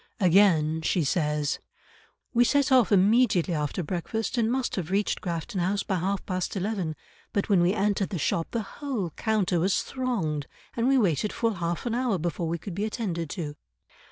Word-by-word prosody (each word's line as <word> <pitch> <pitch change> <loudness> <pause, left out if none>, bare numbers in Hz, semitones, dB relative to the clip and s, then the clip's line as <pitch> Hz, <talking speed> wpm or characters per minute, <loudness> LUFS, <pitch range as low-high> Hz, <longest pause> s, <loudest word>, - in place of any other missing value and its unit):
Again 170 -5 +4
she 170 +1 +1
says, 150 -1 0 0.7
"We 240 0 +5
set 280 +3 +2
off 250 -7 +5
immediately 200 -2 +4
after 150 +3 -2
breakfast, 190 - -3
and 230 -1 +1
must 260 0 -1
have 175 -5 -3
reached 200 +2 0
Grafton 175 +3 -3
House 195 +3 0
by 190 - -1
half 195 +3 -2
past 185 0 -2
eleven; 190 -5 -2 0.4
but 200 - 0
when 195 -4 +5
we 175 +2 +3
entered 200 -1 +1
the 190 - -3
shop 165 +2 0
the 230 -2 -2 0.2
whole 240 - -2
counter 200 -3 0
was 185 +3 +1
thronged 190 - -2 0.3
and 235 +1 +1
we 270 0 +4
waited 200 - +1
full 230 -1 0
half 175 0 -3
an 235 - -1
hour 245 -4 +1
before 170 0 -2
we 170 +1 -1
could 185 +3 -7
be 200 +4 -2
attended 180 -8 -3
to." 150 -5 -5
190 Hz, 185 wpm, -27 LUFS, 170-220 Hz, 0.7 s, We